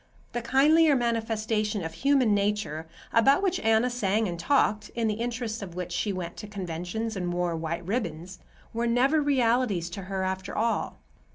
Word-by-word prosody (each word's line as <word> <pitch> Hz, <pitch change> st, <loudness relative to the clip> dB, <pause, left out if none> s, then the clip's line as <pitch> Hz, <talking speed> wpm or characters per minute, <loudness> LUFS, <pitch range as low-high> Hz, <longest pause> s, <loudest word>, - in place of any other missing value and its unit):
The 240 Hz, -, -3 dB
kindlier 295 Hz, +5 st, +4 dB
manifestation 220 Hz, -3 st, -1 dB
of 160 Hz, 0 st, -5 dB
human 255 Hz, +3 st, +3 dB
nature 200 Hz, -6 st, -1 dB, 0.3 s
(about 275 Hz, -, +4 dB
which 370 Hz, -2 st, +1 dB
Anna 225 Hz, +3 st, +2 dB
sang 220 Hz, -2 st, +1 dB
and 170 Hz, -2 st, -4 dB
talked, 215 Hz, -2 st, +1 dB
in 230 Hz, -1 st, 0 dB
the 215 Hz, -, +1 dB
interests 235 Hz, -2 st, -3 dB
of 180 Hz, -4 st, -8 dB
which 180 Hz, -1 st, -4 dB
she 190 Hz, +4 st, -1 dB
went 180 Hz, -3 st, -5 dB
to 210 Hz, -, -7 dB
conventions 195 Hz, +3 st, -4 dB
and 180 Hz, -2 st, -2 dB
wore 175 Hz, -1 st, -1 dB
white 165 Hz, +1 st, -4 dB
ribbons) 185 Hz, -4 st, -3 dB, 0.3 s
were 235 Hz, +1 st, 0 dB
never 265 Hz, +6 st, +3 dB
realities 240 Hz, -, +1 dB
to 195 Hz, -, -6 dB
her 190 Hz, 0 st, -2 dB
after 190 Hz, +1 st, -3 dB
all. 230 Hz, +1 st, 0 dB
215 Hz, 170 wpm, -27 LUFS, 180-240 Hz, 0.3 s, kindlier